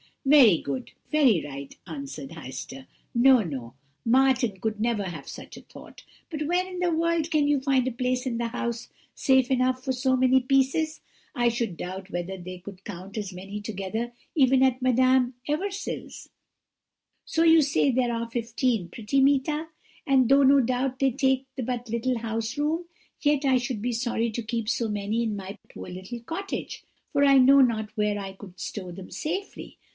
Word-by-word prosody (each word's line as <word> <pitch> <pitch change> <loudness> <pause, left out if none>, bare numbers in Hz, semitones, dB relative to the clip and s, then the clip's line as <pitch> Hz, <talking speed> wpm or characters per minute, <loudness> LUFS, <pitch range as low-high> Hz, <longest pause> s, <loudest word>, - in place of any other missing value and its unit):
"'Very 270 - +7
good, 135 -2 -5 0.2
very 265 - +4
right,' 140 -1 -8
answered 140 -4 -7
Heister. 135 -3 -8 0.3
'No, 255 +1 +6
no! 135 - -6 0.3
Martin 250 -4 +3
could 215 +1 -2
never 225 -2 0
have 170 -7 -7
such - - -9
a - - -10
thought. - - -14 0.3
But 305 -2 -3
where 360 +2 +1
in 365 -1 -7
the 355 -1 +1
world 335 0 +1
can 300 -2 +3
you 290 -1 +3
find 265 -2 +1
a - - 0
place 250 +1 -1
in 240 -3 -2
the 235 0 -1
house 235 0 -4 0.3
safe 265 -2 +3
enough 255 0 +1
for 260 - -1
so 260 +1 +1
many 260 0 +4
pieces? 270 +5 +1 0.3
I 240 -2 +3
should 230 -6 -2
doubt 185 +3 -6
whether 175 +2 -4
they 185 0 -8
could 190 +1 -11
count 195 +1 -8
as 200 -3 -4
many 195 +3 -7
together 215 +3 -4 0.2
even 265 -3 +4
at 260 -1 +2
Madame 255 0 +3
Eversil's. 385 +7 -4 1.0
So 325 - +1
you 325 -1 +7
say 275 -1 +2
there 245 -1 +1
are 230 0 -3
fifteen, 230 -4 -1
pretty 230 +8 0
Meeta? 285 +3 +2 0.4
and 260 -3 +4
though 275 +1 +6
no 275 +1 +6
doubt 255 +1 -1
they 270 -1 +3
take 265 0 +1 0.2
but 245 -1 -4
little 235 +2 -1
house 225 +2 -3
room, 315 +4 0 0.4
yet 295 -1 +2
I 265 -1 +4
should 240 -3 -3
be 245 +3 -1
sorry 235 -1 -1
to 235 +2 -4
keep 230 -1 -3
so 235 -1 0
many 210 +2 -1
in 220 -2 -2
my 195 0 -7
poor - - -9
little 185 +6 -7
cottage, 345 +11 -5 0.3
for 285 -1 +2
I 275 -1 +6
know 270 +2 +7
not 220 -4 +1
where 210 -1 +1
I 195 -1 -6
could 190 -2 -13
stow 185 -4 -5
them 180 +1 -10
safely. 375 +6 -5
245 Hz, 180 wpm, -26 LUFS, 205-270 Hz, 1.0 s, Very